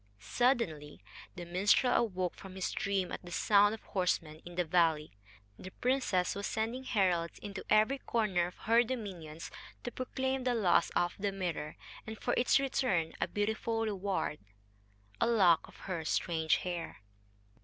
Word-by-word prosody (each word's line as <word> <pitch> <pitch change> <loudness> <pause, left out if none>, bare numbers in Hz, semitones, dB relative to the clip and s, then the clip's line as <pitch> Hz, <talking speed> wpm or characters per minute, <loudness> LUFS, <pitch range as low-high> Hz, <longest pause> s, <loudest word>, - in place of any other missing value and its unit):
Suddenly 155 - 0 0.3
the 175 - -6
minstrel 200 +8 +3
awoke 185 -6 0
from 190 -1 -11
his 190 - -2
dream 195 -2 -1
at - - -5
the 175 - -10
sound 205 +4 +4
of 225 - -16
horsemen 165 -4 -1
in 175 0 -10
the 180 0 +1
valley. 160 -2 +2 0.5
The 185 - -8
princess 245 -6 0
was 200 0 -3
sending 230 +4 -2
heralds 180 -7 +1
into 200 -1 -7
every 215 +6 +4
corner 195 -9 0
of 180 - -11
her 230 +1 +5
dominions 185 -10 -6 0.3
to 245 - -4
proclaim 265 +1 -2
the 250 -1 +1
loss 190 -6 +3
of 175 0 +2
the 200 0 0
mirror, 175 -6 -3 0.3
and 220 0 -6
for 245 - -1
its 245 - +4
return 255 -12 0
a - - +2
beautiful 220 +2 -1
reward 195 -7 -2 0.8
a - - +3
lock 190 -8 +4
of - - -16
her 180 -4 -4
strange 160 0 +1
hair. 175 - -5
195 Hz, 155 wpm, -32 LUFS, 175-225 Hz, 0.8 s, her